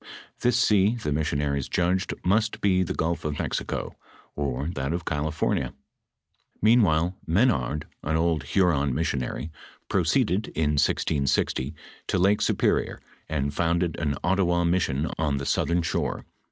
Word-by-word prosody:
This 125 -1 +2
sea 105 -2 +3
the 110 -10 -3
mis 75 +1 0
sionaries 70 -2 -1
judged 90 +2 0
must 105 +4 +1
be 95 -2 +3
the 90 - -2
gulf 85 +1 -1
of 75 -2 -2
Mexico, - - -3 0.4
or 70 +2 -2
that 70 +1 -2
of 85 0 -3
Call 75 0 -1
fornia.f 80 - -1 0.9
Mea«while 95 -5 +3
Menard, 80 - +1 0.2
an 80 +2 -1
old 80 -3 +1
Iluron 75 -6 +2
missionary, 70 0 -2 0.4
proceeded, 95 +5 +1
in 75 -1 +1
1660, 70 -2 0 0.3
to - - 0
Lake 100 +3 +3
Superior, - - +1 0.3
an<> 70 -2 -1
founded 85 +2 0
an 75 -3 0
Ottawa 90 -1 +2
'mission 85 -4 +1
on 75 -3 +1
the 70 - -4
southern 85 +4 +1
shore. - - -2
80 Hz, 140 wpm, -26 LUFS, 75-95 Hz, 0.9 s, sea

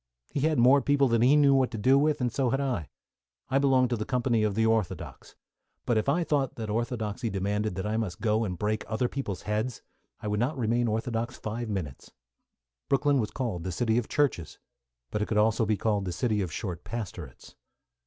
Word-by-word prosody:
He - - 0
had 155 +1 +1
more 130 +4 +6
people 140 -1 +3
than 115 -2 +2
he 130 +5 +5
knew 145 -2 +5
what 130 -2 +3
to 115 - -6
do 130 +6 +4
with, 145 0 +2
and 125 -1 0
so 135 -3 +1
had 135 +3 0
I. 125 - -2 0.6
I 135 - +3
belonged 130 -3 +3
to - - +2
the 110 - -3
company 120 -2 +1
of 105 -2 0
the 110 +1 +2
orthodox, 110 -4 -2 0.5
but 120 - +1
if 110 +4 +1
I 170 +5 +2
thought 145 -5 0
that 110 -2 -4
orthodoxy 115 0 -2
demanded 100 0 -1
that 95 - -3
I 110 +1 -1
must 100 -6 -3
go 110 0 +1
and 90 -5 -3
break 105 +3 -1
other 110 +3 0
people's 115 -9 -5
heads 110 +3 -2 0.4
I 105 - -6
would 105 0 0
not 130 +6 0
remain 120 0 +1
orthodox 115 +2 -2
five 115 +2 -4
minutes. 90 -10 -5 0.8
Brooklyn 140 0 +3
was 110 - -1
called 115 -10 -3
the 95 - -3
city 110 +6 +1
of 120 - -5
churches, 135 - 0 0.5
but 105 - -1
it 105 - -1
could 110 - -1
also 110 +1 +3
be 105 -1 +1
called 105 -2 0
the 90 - -3
city 105 +4 0
of 90 -4 -3
short 90 -1 -5
pastorates. 90 - -7
115 Hz, 215 wpm, -28 LUFS, 105-130 Hz, 0.8 s, more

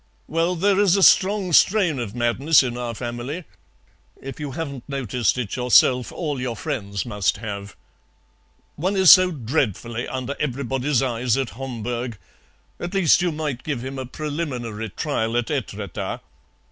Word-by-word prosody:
"Well, 165 +3 0
there 195 +3 +2
is 200 -3 +4
a 195 - +3
strong 195 -2 +4
strain 180 -6 +4
of 115 -2 -5
madness 125 +6 +3
in 120 -2 -3
our 120 -1 -4
family. 120 +8 -5 0.8
If 135 0 -8
you 145 -3 -5
haven't 140 -4 -6
noticed 125 -5 0
it 120 -5 -3
yourself 125 0 +4
all 150 -6 -3
your 125 -2 -3
friends 100 - -4
must 105 -5 0
have." 100 -2 -6 1.0
"One 185 +6 -1
is 190 -3 +8
so 185 0 +8
dreadfully 120 - -2
under 130 +2 -4
everybody's 135 0 -1
eyes 125 -1 0
at 135 -3 -2
Homburg. 120 -2 -5 0.6
At 175 +3 -5
least 175 -3 +4
you 175 -1 +1
might 150 -5 -3
give 130 -5 -4
him 135 0 -5
a 130 - -5
preliminary 130 -7 -4
trial 115 -2 -2
at 120 +3 -1
Etretat." 105 - -4
130 Hz, 150 wpm, -23 LUFS, 120-155 Hz, 1.0 s, is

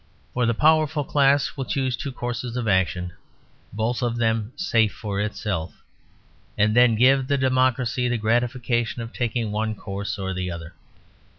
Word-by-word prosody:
For 125 -1 +1
the 115 - +1
powerful 155 +1 +3
class 140 0 +2
will 135 -2 -3
choose 130 -2 -1
two 140 - -5
courses 120 -1 -4
of 120 -2 -2
action, 90 -3 +1 0.6
both 110 +3 -1
of 120 -1 -1
them 110 -1 0
safe 115 - +2
for 100 -2 -4
itself, 100 -5 -4 0.7
and 105 +1 +3
then 120 -2 +6
give 130 +3 +4
the 140 0 +1
democracy 130 -1 +1
the 120 - 0
gratification 120 +1 0
of 115 - -9
taking 115 -2 -2
one 110 +1 -1
course 100 0 -5
or 95 -1 -3
the 90 0 -3
other. 85 0 -7
120 Hz, 160 wpm, -24 LUFS, 105-130 Hz, 0.7 s, then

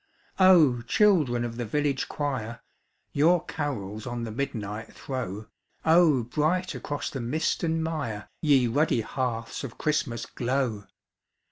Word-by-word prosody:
Oh, 165 -10 +6
children 130 - +3
of 115 -1 -6
the 120 - -2
village 140 +3 0
choir, 120 -6 -3 0.5
Your 165 +4 +3
carols 110 -8 -4
on 120 -1 -3
the 115 - -4
midnight 110 -4 -4
throw, 110 -6 -5 0.4
Oh 160 -6 +5
bright 155 +9 0
across 145 0 -4
the 135 - -4
mist 135 +7 -1
and 165 -1 0
mire 140 -11 -3
Ye 140 -5 +4
ruddy 120 0 +2
hearths 115 0 -3
of 130 -4 -7
Christmas 125 -6 -1
glow! 120 -5 -2
130 Hz, 130 wpm, -27 LUFS, 115-150 Hz, 0.5 s, Oh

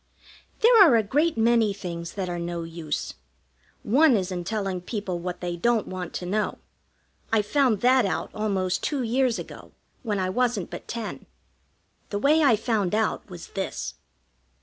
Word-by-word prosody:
There 460 -2 +8
are 300 -10 +6
a 225 - +3
great 295 +8 +1
many 225 -2 +3
things 170 -3 -6
that 190 -2 -3
are 175 -1 -3
no 170 0 -3
use. 165 -2 -4 0.7
One 265 +2 +5
is 190 -1 -2
in 175 -1 -3
telling 195 -2 -2
people 190 -2 -4
what 180 +1 -5
they 175 -1 -3
don't 225 +4 +1
want 185 -2 -5
to 180 - -4
know. 210 +4 -1 0.7
I 220 -2 +3
found 250 -1 +2
that 255 +1 +5
out 195 - -2
almost 195 -4 -1
two 280 -4 -1
years 245 +1 +1
ago, - - -10 0.3
when 215 -5 -2
I 185 -1 -1
wasn't 240 -4 0
but - - -8
ten. 230 -2 -6 0.8
The 205 - -2
way 295 +8 +4
I 270 -7 +5
found 210 -4 0
out 220 -1 -1
was 175 -2 -9
this. 195 -1 -4
210 Hz, 170 wpm, -25 LUFS, 180-240 Hz, 0.8 s, There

